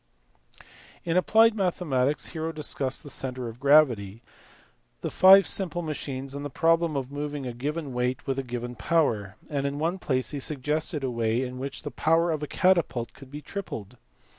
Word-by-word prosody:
In 165 Hz, -1 st, 0 dB
applied 225 Hz, +5 st, +5 dB
mathematics 155 Hz, -9 st, 0 dB
Hero 160 Hz, 0 st, -3 dB
discussed 145 Hz, -4 st, -1 dB
the 145 Hz, -, -9 dB
centre 130 Hz, -2 st, -2 dB
of 115 Hz, +1 st, -9 dB
gravity, 125 Hz, -8 st, +3 dB, 0.8 s
the -, -, -4 dB
live 190 Hz, +1 st, +9 dB
simple 175 Hz, -3 st, -1 dB
machines, 135 Hz, -3 st, -5 dB
and 140 Hz, 0 st, -5 dB
the 145 Hz, -, -4 dB
problem 165 Hz, +2 st, +2 dB
of 135 Hz, 0 st, -4 dB
moving 145 Hz, -1 st, -4 dB
a 125 Hz, -, -4 dB
given 145 Hz, +3 st, -4 dB
weight 125 Hz, +1 st, -1 dB
with 135 Hz, -1 st, -1 dB
a -, -, -2 dB
given 120 Hz, -1 st, -5 dB
power; 115 Hz, -, 0 dB
and 140 Hz, -2 st, -2 dB
in 140 Hz, +1 st, -4 dB
one 165 Hz, +5 st, -1 dB
place 130 Hz, -6 st, 0 dB
he 145 Hz, -, -4 dB
suggested 150 Hz, +1 st, 0 dB
a 130 Hz, -, -1 dB
way 115 Hz, +1 st, 0 dB
in 125 Hz, 0 st, -6 dB
which 140 Hz, +3 st, -5 dB
the 145 Hz, -, -5 dB
power 165 Hz, +2 st, +2 dB
of 155 Hz, -2 st, -2 dB
a 150 Hz, -, -3 dB
catapult 170 Hz, -11 st, +1 dB
could 135 Hz, -, -14 dB
be 145 Hz, +2 st, -8 dB
tripled. 125 Hz, -, -7 dB
145 Hz, 180 wpm, -26 LUFS, 125-165 Hz, 0.8 s, live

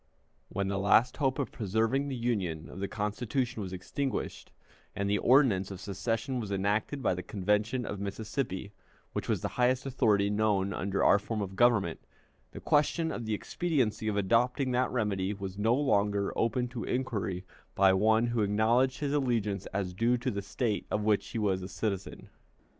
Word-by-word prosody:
When 100 Hz, +1 st, -2 dB
the 100 Hz, 0 st, -1 dB
last 110 Hz, +5 st, +4 dB
hope 135 Hz, -3 st, +1 dB
of 140 Hz, -, -2 dB
preserving 115 Hz, +6 st, 0 dB
the 135 Hz, -, -3 dB
Union 100 Hz, -10 st, -2 dB
of -, -, -9 dB
the 100 Hz, -, -2 dB
Constitution 110 Hz, +4 st, -2 dB
was 95 Hz, -2 st, -5 dB
extinguished, 120 Hz, +9 st, -4 dB, 0.4 s
and 100 Hz, -1 st, -1 dB
the 105 Hz, +1 st, +1 dB
ordinance 120 Hz, -8 st, +4 dB
of 95 Hz, -2 st, -7 dB
secession 115 Hz, +7 st, -2 dB
was 105 Hz, -4 st, -5 dB
enacted 105 Hz, +8 st, -1 dB
by -, -, +3 dB
the 90 Hz, -, -4 dB
Convention 105 Hz, +6 st, 0 dB
of 100 Hz, -, -5 dB
Mississippi, 100 Hz, 0 st, -4 dB, 0.4 s
which -, -, -4 dB
was -, -, +1 dB
the -, -, -1 dB
highest 130 Hz, +2 st, +2 dB
authority 105 Hz, -7 st, +2 dB
known 105 Hz, -2 st, +1 dB
under 100 Hz, +2 st, -1 dB
our 100 Hz, -, +6 dB
form 110 Hz, +2 st, -4 dB
of 95 Hz, -2 st, -4 dB
government, 105 Hz, -7 st, +3 dB, 0.5 s
the -, -, -8 dB
question 160 Hz, +2 st, +2 dB
of 120 Hz, -, -4 dB
the 110 Hz, -, 0 dB
expediency 120 Hz, -, -1 dB
of 105 Hz, -1 st, 0 dB
adopting 125 Hz, +6 st, +2 dB
that 125 Hz, +1 st, +1 dB
remedy 105 Hz, -4 st, -1 dB
was 100 Hz, 0 st, -6 dB
no 115 Hz, +3 st, +3 dB
longer 100 Hz, -7 st, +1 dB
open 120 Hz, +2 st, +1 dB
to 120 Hz, -2 st, -5 dB
inquiry 100 Hz, -8 st, -2 dB, 0.3 s
by 95 Hz, -1 st, +5 dB
one 110 Hz, +4 st, +3 dB
who 120 Hz, -1 st, 0 dB
acknowledged 115 Hz, +6 st, +2 dB
his 145 Hz, -1 st, -1 dB
allegiance 115 Hz, -8 st, 0 dB
as 95 Hz, -2 st, -3 dB
due 115 Hz, +6 st, +2 dB
to 125 Hz, +2 st, -2 dB
the 100 Hz, -, -3 dB
State 105 Hz, +2 st, -2 dB
of 105 Hz, -, -1 dB
which 105 Hz, -1 st, +2 dB
he -, -, -5 dB
was 100 Hz, -4 st, +1 dB
a 90 Hz, -, -5 dB
citizen. 95 Hz, 0 st, -4 dB
105 Hz, 180 wpm, -30 LUFS, 100-125 Hz, 0.5 s, our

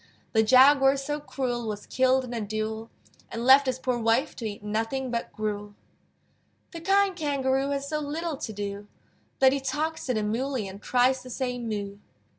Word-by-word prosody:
The 220 Hz, -, +5 dB
Jaguar 270 Hz, +4 st, +6 dB
so 295 Hz, +2 st, -3 dB
cruel 245 Hz, -5 st, -3 dB
Was 210 Hz, -1 st, -5 dB
killed 260 Hz, 0 st, +2 dB
in 245 Hz, -, -7 dB
a 230 Hz, -, -2 dB
duel, 215 Hz, +2 st, -4 dB, 0.4 s
And 230 Hz, +1 st, -4 dB
left 270 Hz, +1 st, +7 dB
his 255 Hz, -1 st, 0 dB
poor 255 Hz, -2 st, -1 dB
wife 230 Hz, +5 st, +1 dB
To 230 Hz, -, -5 dB
eat 205 Hz, -1 st, -7 dB
nothing 225 Hz, +5 st, -2 dB
but 235 Hz, -1 st, -3 dB
gruel. 210 Hz, -1 st, -4 dB, 1.0 s
The 335 Hz, -, -8 dB
kind 390 Hz, +2 st, +3 dB
Kangaroo 275 Hz, -4 st, 0 dB
Has 280 Hz, 0 st, -2 dB
so 305 Hz, +1 st, -2 dB
little 305 Hz, +1 st, -3 dB
to 225 Hz, -, -5 dB
do, 205 Hz, 0 st, -5 dB, 0.5 s
That 265 Hz, 0 st, +5 dB
he 280 Hz, -, 0 dB
talks 300 Hz, +4 st, -3 dB
to 250 Hz, -, 0 dB
the 215 Hz, -, 0 dB
Moolly 235 Hz, +1 st, -2 dB
And 195 Hz, +1 st, -10 dB
tries 255 Hz, +1 st, +2 dB
to 255 Hz, -, -11 dB
say 250 Hz, 0 st, -3 dB
"Moo!" 205 Hz, -4 st, -4 dB
255 Hz, 185 wpm, -27 LUFS, 220-275 Hz, 1.0 s, left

